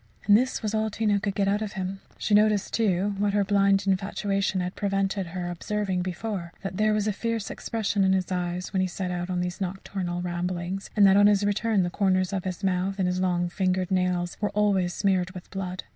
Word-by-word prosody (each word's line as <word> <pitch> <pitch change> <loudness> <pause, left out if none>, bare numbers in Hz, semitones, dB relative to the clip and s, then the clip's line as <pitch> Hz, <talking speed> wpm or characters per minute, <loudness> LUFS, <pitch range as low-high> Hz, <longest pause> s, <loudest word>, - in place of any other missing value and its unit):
And 205 - +6
this 250 +1 +1
was 215 0 -1
all 220 0 +1
Tina 210 -1 +1
could 200 -1 -2
get 200 -1 +1
out 205 +2 +1
of 210 -2 -4
him. 190 0 -4 0.2
She 210 - -1
noticed, 210 -1 +3
too, 205 -2 +1
what 205 0 +1
her 205 -1 +3
blind 200 0 +3
infatuation 195 0 0
had 180 +1 -2
prevented 195 -1 -1
her 175 +1 -4
observing 190 +1 -2
before, 180 -1 -4
that 195 -1 -4
there 215 0 +3
was 210 -1 +1
a 210 - +1
fierce 230 0 -3
expression 210 -3 -1
in 190 0 +4
his 190 -1 -1
eyes 180 0 -3
when 190 - +2
he 185 - +1
set 180 0 -4
out 175 0 -3
on 180 -1 -1
these 180 +2 -4
nocturnal 185 -1 -3
rambles, 180 +2 -3
and 205 -2 +6
that 195 0 +6
on 205 0 +7
his 205 -1 +3
return 205 0 +1
the 175 - -2
corners 185 -1 +1
of 190 -1 -2
his 185 +1 -4
mouth 190 +1 0
and 190 -2 +1
his 180 0 -1
long 175 -1 +1
finger 185 0 0
nails 180 -1 0
were 205 - +1
always 195 -4 +2
smeared 190 -2 +1
with 180 - -10
blood. 185 -1 -4
195 Hz, 220 wpm, -26 LUFS, 180-205 Hz, 0.2 s, on